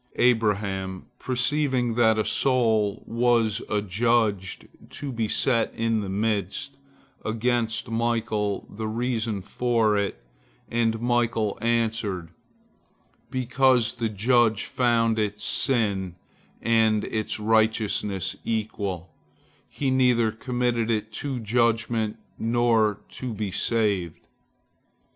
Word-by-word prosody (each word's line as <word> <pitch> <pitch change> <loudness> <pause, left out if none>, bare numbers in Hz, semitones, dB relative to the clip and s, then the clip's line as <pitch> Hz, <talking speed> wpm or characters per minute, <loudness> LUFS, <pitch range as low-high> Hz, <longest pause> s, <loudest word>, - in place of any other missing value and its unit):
Abraham, 100 -5 +1
perceiving 130 -1 0
that 110 -1 +3
a 110 - +1
soul 110 -6 +1
was 115 -2 +2
adjudged 105 -1 0 0.2
to 145 -2 -6
be 115 -3 -1
set 115 +1 +1
in 115 -1 0
the 100 - -5
midst, 105 +5 -2 0.5
asked 115 0 -1
Michael 115 -3 -1
the 110 +1 -5
reason 115 -3 -2
for 115 -1 +1
it, 100 -11 -2 0.5
and 115 -1 +1
Michael 115 -3 +1
answered, 110 -7 -1 1.0
"Because 130 -2 +2
the 115 -2 -2
judge 110 +1 +2
found 115 -2 +1
its 105 -1 -2
sins 100 -8 0 0.5
and 110 -2 +3
its 110 0 -3
righteousness 110 -3 +1
equal, 100 -6 -3 0.6
he 135 -2 -1
neither 125 -3 +3
committed 120 0 -1
it 110 -1 -1
to 135 +2 -3
judgment 115 -1 +1 0.2
nor 115 -2 +2
to 125 -4 -6
be 105 -2 -3
saved." 100 -6 0
115 Hz, 100 wpm, -25 LUFS, 105-120 Hz, 1.0 s, that